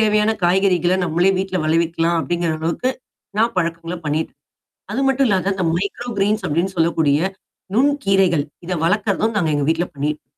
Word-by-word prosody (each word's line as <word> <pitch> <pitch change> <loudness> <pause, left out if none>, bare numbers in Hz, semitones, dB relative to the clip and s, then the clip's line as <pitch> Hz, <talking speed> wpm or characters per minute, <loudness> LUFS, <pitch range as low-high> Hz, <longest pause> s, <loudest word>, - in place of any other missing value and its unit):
தேவையான 215 0 +3
காய்கறிகள்ல 180 0 +3
நம்மளே 175 +3 +2
வீட்ல 190 -1 -2
விளைவிக்கலாம், 165 +1 +1
அப்படிங்கிற 170 +4 -1
அளவுக்கு 170 +11 -1 0.5
நான் 230 +1 +2
பழக்கங்கள்ல 170 0 -2
பண்ணிட்டேன். 150 -1 -2 0.5
அது 255 - -1
மட்டும் 270 0 +2
இல்லாம 195 -1 +1
இந்த 185 - -1
மைக்ரோ 200 +6 -3
கிரீன்ஸ் 210 +2 +1
அப்படின்னு 170 +6 0
சொல்லக்கூடிய 160 -3 +2 0.6
நுண் 280 +4 +4
கீரைகள் 190 -6 +3 0.2
இதை 180 +1 -2
வளர்க்கிறதும் 210 +3 +1
நாங்க 165 -6 +1
எங்க 145 - 0
வீட்ல 165 +2 +1
பண்ணிட்டு 150 +2 -3
180 Hz, 150 wpm, -20 LUFS, 165-200 Hz, 0.6 s, நுண்